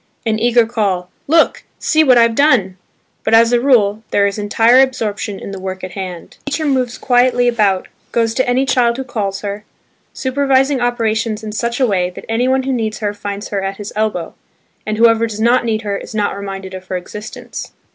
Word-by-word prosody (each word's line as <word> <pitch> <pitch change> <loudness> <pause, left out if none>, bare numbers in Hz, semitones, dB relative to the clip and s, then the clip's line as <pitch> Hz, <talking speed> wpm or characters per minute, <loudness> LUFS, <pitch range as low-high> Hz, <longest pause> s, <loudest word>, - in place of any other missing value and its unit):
an 220 -1 0
eager 235 0 +4
call, 200 -6 -2 0.2
"Look! 325 +3 +3
see 315 -1 +2
what 255 -4 +5
I've 230 -1 +4
done." 230 -9 +3 0.5
But 225 - +3
as 230 +1 +5
a 240 - +3
rule, 220 -6 +3
there 200 - +2
is 200 +1 -2
entire 225 +4 +4
absorption 220 -6 0
in - - -7
the 195 - -6
work 190 0 -6
in 185 - -5
hand. 180 -3 -7
The 285 - -4
teacher 310 +2 -1
moves 255 -4 0
quietly 245 -1 +2
about, 210 -6 +1 0.2
goes 230 -1 +1
to 260 +1 0
any 255 +2 +2
child 245 -3 +2
who 265 - -3
calls 205 -6 -3
her, 205 0 -5 0.5
supervising 270 0 +1
operations 225 -2 -1
in 215 - -5
such 235 +3 -2
a 260 - +4
way 185 -5 +1
that 180 - -11
any 230 +3 0
one 265 0 +2
who 270 0 -1
needs 220 -3 -2
her 205 -2 -2
finds 205 0 -6
her 200 -1 -2
at 195 0 -4
his 205 0 -7
elbow, 210 -6 -2 0.5
and 215 0 -1
whoever 230 0 +4
does 215 -1 -7
not 240 +2 +3
need 220 -1 -1
her 200 -1 -2
is - - -9
not 205 -2 0
reminded 195 -1 -6
of 185 0 -9
her 185 - -2
existence. 210 +4 -8
225 Hz, 205 wpm, -17 LUFS, 200-245 Hz, 0.5 s, what